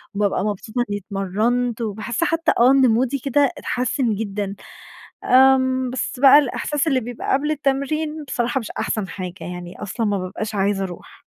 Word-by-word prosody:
وبابقى 200 -1 0
مبسوطة 215 +3 -4
إنّي 205 - -1
اتمرنت، 215 +6 -1
وباحس 220 +5 -2
حتّى 330 -1 +1
آه، 245 +2 +6
إن 270 -1 +5
مودي 255 +4 +1
كده 275 +1 +2
اتحسن 250 -2 -1
جدًا. 200 -1 -4 0.7
آمم، 260 0 +4
بس 250 0 -4
بقى 275 +2 +8
الإحساس 295 +2 -1
اللي 270 -4 +2
بيبقى 245 0 -4
قبل 290 +3 +1
التمرين 300 +2 -1
بصراحة 245 -2 -1
مش 225 - -7
أحسن 210 -3 -2
حاجة 185 -3 -6 0.2
يعني 175 0 -9
أصلًا 215 +3 -3
ما 205 -1 0
بابقاش 210 +4 -5
عايزة 195 0 +1
أروح. 180 -2 -9
240 Hz, 160 wpm, -21 LUFS, 205-270 Hz, 0.7 s, بقى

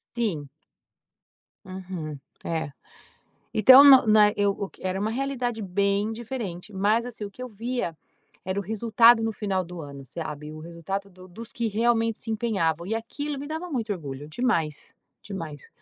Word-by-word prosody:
Sim. 180 - -2 1.2
Uhum, 185 -5 -6 0.3
é, 160 -3 -2 0.8
então, 260 +6 +9
na 270 -2 +10
não, - - -9
na 215 0 +7
ok, 210 - -3 0.5
eu - - +1
era 190 +1 -2
uma 215 +2 0
realidade 245 -2 -2
bem 200 +2 +1
diferente. 220 -5 -6
Mas, 210 +4 +2
assim, 230 -3 -6
o 200 - -6
que 250 - -10
eu 255 - -5
via 230 -5 -3 0.5
era 190 +2 -2
o - - -1
resultado 225 +3 +5
no 225 - 0
final 195 -3 -1
do 175 0 -8
ano, 140 -2 -9
sabe. 150 +1 -6
O 155 - -9
resultado 170 +5 -5
do 185 0 -15
dos 220 +6 -9
que 235 -2 -1
realmente 225 +1 +1
se 225 - -6
empenhavam 190 -8 0
e 220 - -1
aquilo 280 +6 -4
me 285 - -6
dava 320 +4 -4
muito 230 -7 -1
orgulho. 145 -6 -6
Demais, 165 - -1 0.3
demais. 165 -8 -7
205 Hz, 165 wpm, -26 LUFS, 170-235 Hz, 1.2 s, na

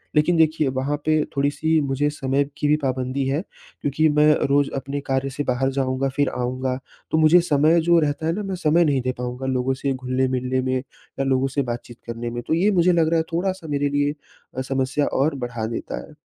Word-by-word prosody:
लेकिन 150 +3 +3
देखिए 155 -2 +3
वहाँ 135 +3 0
पे 155 -1 +3
थोड़ी-सी 155 +3 +1
मुझे 140 +1 0
समय 140 -1 0
की 145 - 0
भी 150 - +4
पाबंदी 130 +1 -1
है। 140 +4 0 0.4
क्योंकि 145 +3 +2
मैं 150 0 +4 0.2
रोज़ 140 0 +2
अपने 140 +1 -3
कार्य 135 0 0
से 140 +2 -3
बाहर 130 +1 0
जाऊँगा 135 0 0
फ़िर 145 -1 +2
आऊँगा 130 +1 -2 0.3
तो 155 - +2
मुझे 160 +3 +6
समय 155 +1 +3
जो 170 +1 +4
रहता 150 0 -1
है 165 - +2
ना 210 +3 -3
मैं 195 -1 -3
समय 170 0 +3
नहीं 140 -3 +1
दे 130 +1 -1
पाऊँगा 125 +1 -4
लोगों 130 0 0
से 140 -1 +1
घुलने-मिलने 130 0 -1
में 130 0 -1
या 135 +1 -7
लोगों 135 0 +2
से 140 +1 -1
बातचीत 120 0 -7
करने 115 0 -4
में। 120 0 -4
तो - - +1
ये 185 +6 +3
मुझे 180 -2 +4
लग 165 -2 +3
रहा 165 - +2
है 160 - +2
थोड़ा-सा 185 -1 -2
मेरे 145 0 0
लिए 145 +1 +1 0.4
अ, 130 - 0
समस्या 135 +2 0 0.2
और 145 +1 +1
बढ़ा 120 -3 -4
देता 115 +1 -4
है। - - -17
140 Hz, 215 wpm, -22 LUFS, 130-155 Hz, 0.4 s, मुझे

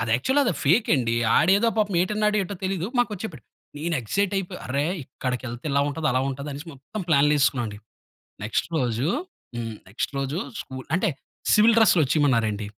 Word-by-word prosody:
యాక్చువల్‌గా 265 - +2
అది 240 - +1
ఫేక్ 175 - +3
అండి. 115 -3 0 0.2
ఆడేదో 200 +7 +4
పాపం 205 -3 +1
ఏటన్నాడో, 210 +2 +1
ఏటో 200 +2 -6
తెలీదు, 185 -2 -1
మాకొచ్చి 215 -4 -1
చెప్పాడు. 170 -9 -9 0.3
నేను 165 +3 -2
ఎక్సైట్ 195 - 0
అయిపోయి, 185 -1 -4
"అరె! 140 +3 0 0.2
ఇక్కడికెళ్తే 125 -1 -5
ఇలా 140 +1 +3
ఉంటది, 155 +2 -2
అలా 130 - +1
ఉంటది," 140 +2 -5
అనేసి 145 +4 -8
మొత్తం 140 +10 -7
ప్లాన్లేసుకున్నావండి. 140 -7 +2 0.7
నెక్స్ట్ 110 - -1
రోజు 125 +1 0 0.5
హ్మ్. 115 -2 -4
నెక్స్ట్ 100 +7 -3
రోజు 135 +4 -2 0.2
,స్కు 130 - -9 0.2
అంటే, 185 - +1 0.4
సివిల్ 220 +1 +6
డ్రెస్‌లో 215 -6 +5
వచ్చేయమన్నారు 130 -5 +2
అండి. 105 0 -4
145 Hz, 160 wpm, -24 LUFS, 130-195 Hz, 0.7 s, సివిల్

